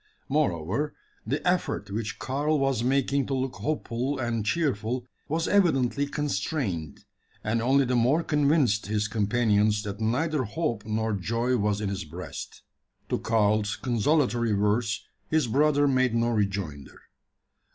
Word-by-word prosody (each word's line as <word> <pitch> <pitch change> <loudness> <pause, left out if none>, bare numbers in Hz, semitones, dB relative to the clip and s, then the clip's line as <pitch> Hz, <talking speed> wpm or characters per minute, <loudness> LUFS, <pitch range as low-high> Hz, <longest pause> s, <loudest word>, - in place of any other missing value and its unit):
Moreover, 135 - 0 0.3
the 150 +5 -1
effort 175 - 0
which 110 +2 -3
Karl 145 +4 0
was 135 -4 +1
making 135 +1 +1
to 135 - -1
look 130 0 -2
hopeful 140 -2 -2
and 120 -3 -1
cheerful 125 -2 -1 0.2
was 160 +3 -1
evidently 145 -8 +2
constrained; 110 - -3 0.4
and 110 +2 0
only 135 +3 +3
the 125 0 0
more 130 +8 +3
convinced 145 -9 +2
his 105 0 0
companions 105 0 +2
that 100 -1 -5
neither 145 +7 +1
hope 115 -2 -2
nor 110 0 0
joy 115 +6 0
was 105 -2 0
in 105 - -1
his 100 0 -3
breast. 85 +4 -8 0.5
To - - 0
Karl's 105 -1 +1
consolatory 120 -2 +1
words 105 +1 0 0.2
his 160 -3 +2
brother 145 +4 +3
made 130 -3 +2
no 115 0 +2
rejoinder. 100 - -2
120 Hz, 135 wpm, -27 LUFS, 105-140 Hz, 0.5 s, only